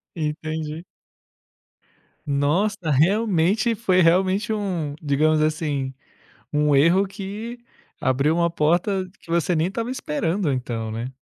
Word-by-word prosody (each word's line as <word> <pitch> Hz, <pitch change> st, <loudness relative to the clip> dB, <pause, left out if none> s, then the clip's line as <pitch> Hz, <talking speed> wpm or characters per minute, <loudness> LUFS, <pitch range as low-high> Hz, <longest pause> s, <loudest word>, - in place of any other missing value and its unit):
Entendi. 155 Hz, 0 st, -4 dB, 1.4 s
Nossa, 160 Hz, +7 st, 0 dB
realmente 195 Hz, -, +2 dB
foi 190 Hz, -4 st, +2 dB
realmente 190 Hz, +5 st, +2 dB
um 180 Hz, -9 st, -2 dB
digamos 155 Hz, +1 st, +2 dB
assim, 150 Hz, -4 st, -1 dB, 0.6 s
um 150 Hz, -1 st, +2 dB
erro 170 Hz, +8 st, +5 dB
que 205 Hz, +5 st, -7 dB, 0.4 s
abriu 135 Hz, +5 st, +2 dB
uma 170 Hz, 0 st, +2 dB
porta 175 Hz, +4 st, 0 dB
que -, -, -22 dB
você 170 Hz, 0 st, +1 dB
nem 160 Hz, -, +2 dB
estava 230 Hz, +6 st, -3 dB
esperando 165 Hz, -, -1 dB
então, 115 Hz, -4 st, -3 dB
né. 115 Hz, +3 st, -4 dB
165 Hz, 110 wpm, -23 LUFS, 150-195 Hz, 1.4 s, erro